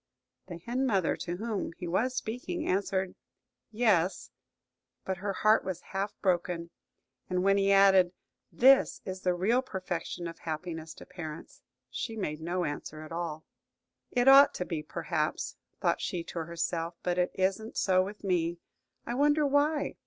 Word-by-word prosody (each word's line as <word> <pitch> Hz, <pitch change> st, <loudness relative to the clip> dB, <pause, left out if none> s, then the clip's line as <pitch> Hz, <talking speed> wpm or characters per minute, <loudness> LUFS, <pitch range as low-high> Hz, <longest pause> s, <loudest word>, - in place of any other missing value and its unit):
The 175 Hz, -, -7 dB
hen 245 Hz, +9 st, -1 dB
mother, 195 Hz, -7 st, +2 dB
to 175 Hz, 0 st, -4 dB
whom 215 Hz, -4 st, -3 dB
he 180 Hz, -, -5 dB
was 245 Hz, +9 st, 0 dB
speaking, 255 Hz, +8 st, -3 dB
answered 190 Hz, -1 st, 0 dB, 0.6 s
"Yes;" 205 Hz, -6 st, +1 dB, 0.7 s
but 190 Hz, -1 st, -2 dB
her 200 Hz, +3 st, -2 dB
heart 215 Hz, +3 st, +4 dB
was 185 Hz, -2 st, -4 dB
half 195 Hz, +2 st, -3 dB
broken. 175 Hz, -2 st, 0 dB, 0.6 s
And 180 Hz, 0 st, 0 dB
when 195 Hz, +1 st, +4 dB
he 195 Hz, 0 st, +3 dB
added, 195 Hz, -2 st, +6 dB, 0.4 s
"This 265 Hz, +2 st, +5 dB
is 185 Hz, -1 st, -5 dB
the 180 Hz, -1 st, +1 dB
real 220 Hz, +8 st, +2 dB
perfection 180 Hz, -6 st, -4 dB
of 165 Hz, 0 st, -9 dB
happiness 160 Hz, 0 st, -5 dB
to -, -, -12 dB
parents," 160 Hz, -3 st, -9 dB, 0.3 s
she 225 Hz, -, -4 dB
made 155 Hz, -7 st, -3 dB
no 175 Hz, +2 st, -1 dB
answer 155 Hz, +1 st, -5 dB
at 155 Hz, -, -11 dB
all. 165 Hz, -2 st, -4 dB, 0.6 s
"It 245 Hz, 0 st, +1 dB
ought 275 Hz, +1 st, +8 dB
to 180 Hz, -, -2 dB
be, 165 Hz, -3 st, -3 dB
perhaps," -, -, -2 dB, 0.3 s
thought -, -, +1 dB
she 175 Hz, -2 st, -2 dB
to 165 Hz, -1 st, -5 dB
herself, 170 Hz, 0 st, -2 dB
"but 180 Hz, 0 st, 0 dB
it 180 Hz, -, +2 dB
isn't 195 Hz, +4 st, -1 dB
so 185 Hz, -1 st, +3 dB
with 205 Hz, +3 st, -8 dB
me. 175 Hz, -3 st, 0 dB, 0.5 s
I -, -, -3 dB
wonder 295 Hz, +3 st, +3 dB
why?" 290 Hz, +2 st, +1 dB
185 Hz, 160 wpm, -30 LUFS, 170-220 Hz, 0.7 s, ought